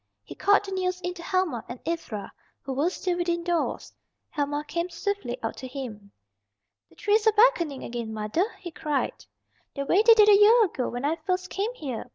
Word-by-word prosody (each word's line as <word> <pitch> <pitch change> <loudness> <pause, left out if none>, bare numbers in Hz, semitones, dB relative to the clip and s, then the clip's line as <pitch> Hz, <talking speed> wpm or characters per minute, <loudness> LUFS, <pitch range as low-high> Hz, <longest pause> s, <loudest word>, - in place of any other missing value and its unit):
He - - -10
called 410 0 +3
the 390 - -7
news 365 -1 -1
in 360 0 -3
to 350 - -10
Helma 340 - -1
and 240 - -7
Ivra, 230 -12 -4 0.3
who 270 - -4
were 290 +6 +1
still 360 -1 -2
within 345 -1 -1
doors. 345 -1 -2 0.4
Helma 290 -1 -2
came 340 +1 -2
swiftly 350 -7 -3
out 225 - -3
to 260 - -7
him. 230 -7 -8 0.8
"The 160 - -22
trees 420 - +2
are - - +7
beckoning 410 - +3
again, 235 -2 -5
mother," 215 - 0
he 350 -3 -8
cried. 300 -3 -3 0.5
"The 280 -1 -3
way 365 +8 +4
they 455 +1 +7
did 425 -2 +6
a 410 -1 +7
year 445 +2 +7
ago 265 -9 -3
when 245 +3 -4
I 315 +3 0
first 365 +3 -2
came 425 +6 -2
here. 260 - -6
340 Hz, 200 wpm, -26 LUFS, 265-385 Hz, 0.8 s, are